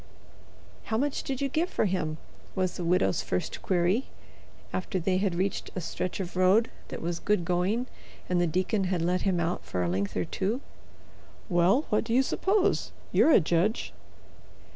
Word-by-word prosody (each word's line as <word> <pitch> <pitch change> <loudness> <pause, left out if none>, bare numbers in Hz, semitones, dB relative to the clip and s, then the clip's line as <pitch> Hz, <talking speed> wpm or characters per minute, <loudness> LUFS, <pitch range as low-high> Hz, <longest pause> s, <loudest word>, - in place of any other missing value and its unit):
"How 220 - -1
much 285 +3 0
did 265 -1 -4
you 280 - +2
give 320 +6 0
for - - +1
him?" 155 -5 -1 0.4
was 185 -2 0
the 180 - -4
widow's 170 - +2
first 90 - -3
query, 185 +7 +1 0.7
after 185 +1 -2
they 185 +2 +1
had 190 -2 0
reached 190 +2 -1
a - - -1
stretch 180 +2 -3
of 180 -2 -5
road 190 +5 +4 0.2
that - - -7
was 170 0 -2
good 205 -5 +1
going 185 +8 +1 0.4
and 180 -1 +2
the 175 - +2
deacon 185 +5 0
had 180 -2 0
let 180 +2 +1
him 190 -3 +1
out 170 +1 -1
for 90 - -2
a - - 0
length 95 +3 -1
or 90 - 0
two. 215 +7 -2 0.9
"Well, 185 - +3
what 210 - +2
do 230 +1 -1
you 265 - +5
suppose? 385 +7 +1 0.2
You're - - +5
a - - +7
judge." 175 +6 0
185 Hz, 180 wpm, -28 LUFS, 175-220 Hz, 0.9 s, a